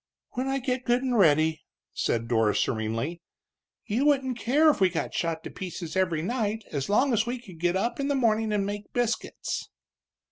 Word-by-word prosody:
"When 255 +2 -2
I 270 0 0
get 255 -1 -2
good 245 +2 +2
and 255 -2 0
ready," 160 -5 +4 0.3
said 115 0 -1
Dora, 110 -3 +2
serenely. 115 +10 -1 0.6
"You 230 +4 0
wouldn't 265 -3 +2
care 295 +8 +4
if 285 - -5
we 190 - +6
got 165 - -3
shot 165 -2 -2
to - - -7
pieces 175 -3 -6
every 175 -4 +1
night 220 0 -1
as 140 +1 -2
long 255 +6 +3
as 225 +1 +2
we 245 +1 -2
could 190 -9 -13
get 175 +1 +1
up 235 +7 -1
in 275 - 0
the 285 - +1
morning 225 -4 +2
and 205 -2 +1
make 205 +1 -5
biscuits!" 235 -2 -2
210 Hz, 190 wpm, -27 LUFS, 165-245 Hz, 0.6 s, we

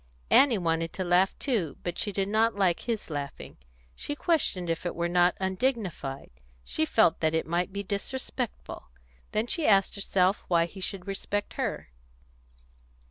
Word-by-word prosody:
Annie 265 -5 +6
wanted 165 -2 -1
to 190 - -3
laugh 180 +2 +3
too, 205 - -1
but 175 - -3
she 205 - 0
did 195 -1 -1
not 220 +2 +2
like 185 -4 +2
his 225 -8 -4
laughing. 145 -2 -6 0.4
She 290 - -4
questioned 295 - +1
if 165 -1 -2
it 175 - -3
were 170 0 0
not 175 0 +3
undignified. 190 - -2 0.3
She 65 - 0
felt 165 +1 +3
that 160 0 +1
it 160 - 0
might 175 +3 -1
be 200 +1 -4
disrespectful. 235 - -4 0.4
Then 215 +1 0
she 315 +5 -1
asked 195 -2 +4
herself 195 -1 +1
why 170 -2 +3
he 190 +3 -10
should 185 -1 -4
respect 200 +1 -3
her. - - -3
190 Hz, 160 wpm, -28 LUFS, 170-210 Hz, 0.4 s, Annie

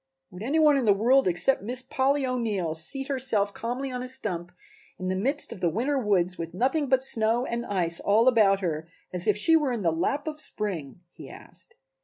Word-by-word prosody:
"Would 180 - -11
any 275 +8 -1
one 300 -3 +5
in 260 - 0
the 205 -2 +4
world 250 +5 +3
except 180 +10 +1
Miss 245 +5 -1
Polly 270 +2 0
O'Neill 220 -10 -2
seat 270 - +1
herself 235 -7 0
calmly 250 +3 -4
on 250 0 -4
a 255 - -5
stump 185 -10 -4 0.5
in 185 0 -4
the 185 - -1
midst 270 +10 0
of - - -8
the 175 -2 +1
winter 260 - -1
woods 185 -6 0
with 165 +1 -6
nothing 270 - 0
but 260 0 +2
snow 230 0 +1
and 235 -1 -3
ice 170 -4 -1
all 220 +4 +2
about 205 -5 +4
her 160 -3 -3 0.3
as 180 -1 -2
if 210 - +3
she 325 +10 +5
were 295 -5 +2
in 230 -4 -3
the 165 - +2
lap 230 - -1
of 305 -1 -4
spring?" 175 - -4
he - - -12
asked. 180 0 -12
225 Hz, 215 wpm, -26 LUFS, 185-265 Hz, 0.5 s, one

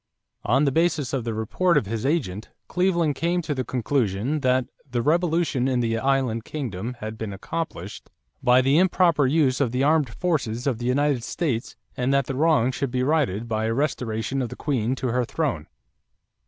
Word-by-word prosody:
On 135 +6 +3
the 140 - +2
basis 160 -3 +1
of 130 -4 -1
the 115 - -2
report 170 - +1
of 140 - +1
his 115 +4 -2
agent, 120 - -1 0.2
Cleveland 175 -4 +1
came 170 +5 0
to 155 - -2
the 130 -2 -2
conclusion 125 +1 -1
that 130 -2 +2 0.2
"the 120 -1 -1
revolution 165 -4 +1
in 130 -2 +1
the 115 -1 0
island 130 -4 0
kingdom 120 -5 -5
had 110 +1 -6
been 110 -2 -4
accomplished 100 - -6 0.3
by 125 +1 +5
the 135 +4 +3
improper 175 -6 +3
use 140 -2 +2
of 125 -5 +1
the 125 +2 0
armed 150 -2 +3
forces 125 -6 -2
of 130 -5 0
the 120 - -3
United 135 -1 +1
States 125 -5 -2 0.2
and 125 +1 0
that 140 -1 +2
the 135 - -4
wrong 140 -3 +3
should 135 +1 -2
be 125 +1 -1
righted 130 -7 +1
by 110 -1 -1
a 115 - 0
restoration 130 -2 -1
of 125 - -2
the - - -7
queen 130 -4 -1
to 130 -1 -2
her 125 +2 +1
throne." 120 - -2
130 Hz, 190 wpm, -24 LUFS, 115-150 Hz, 0.3 s, by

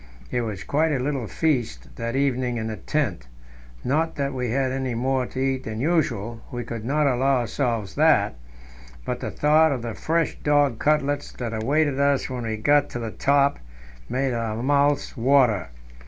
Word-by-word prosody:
It 125 - 0
was 105 -4 -4
quite 155 +2 +1
a 145 - +1
little 130 -2 -2
feast 100 - -1
that 115 +2 -3
evening 130 -3 0
in 110 - -3
the 110 -1 -3
tent; 100 - -2 0.6
not 160 +5 0
that 140 -1 -2
we 125 -2 -2
had 130 +2 0
any 130 -2 -2
more 130 +1 0
to - - -11
eat 130 0 -1
than 110 0 -4
usual 120 - 0
we 120 -1 -4
could 115 -1 -6
not 145 +5 +1
allow 135 0 +2
ourselves 115 -4 -2
that - - +3 0.7
but - - -3
the - - -4
thought 155 +1 +4
of 130 -4 -2
the 115 -2 -4
fresh 165 +5 -1
dog 145 -5 +2
cutlets 145 -1 +1
that 120 -2 -5
awaited 140 +5 +1
us 140 -1 +2
when 125 -2 -4
we 110 -1 -2
got 145 +6 +3
to - - -5
the 115 -2 -4
top 140 +3 +2 0.5
made 130 0 0
our 115 0 -2
mouths 145 +1 +2
water. 125 - +3
130 Hz, 180 wpm, -24 LUFS, 115-145 Hz, 0.7 s, thought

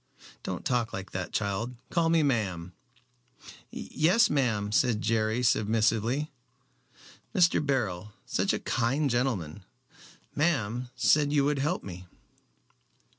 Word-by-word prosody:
"Don't - - -5
talk 120 -3 0
like 95 0 -6
that, 95 -1 -4
child. 110 +4 -2 0.2
Call 165 -1 +2
me 165 -1 +3
ma'am." 95 - -1 1.0
"Yes, 185 +8 +2
ma'am," 110 -8 0
said 115 0 +2
Jerry, 110 +2 0
submissively. 115 +5 +1 1.0
"Mr. 175 -4 +4
Beryl 105 -9 -1
such - - 0
a - - 0
kind 135 +5 0
gentleman, 105 - -1 0.7
ma'am 125 -6 0
said 145 -1 +3
you 145 -2 +3
would 145 -1 +1
help 150 +6 -1
me." 90 -1 -9
120 Hz, 115 wpm, -28 LUFS, 105-145 Hz, 1.0 s, Mr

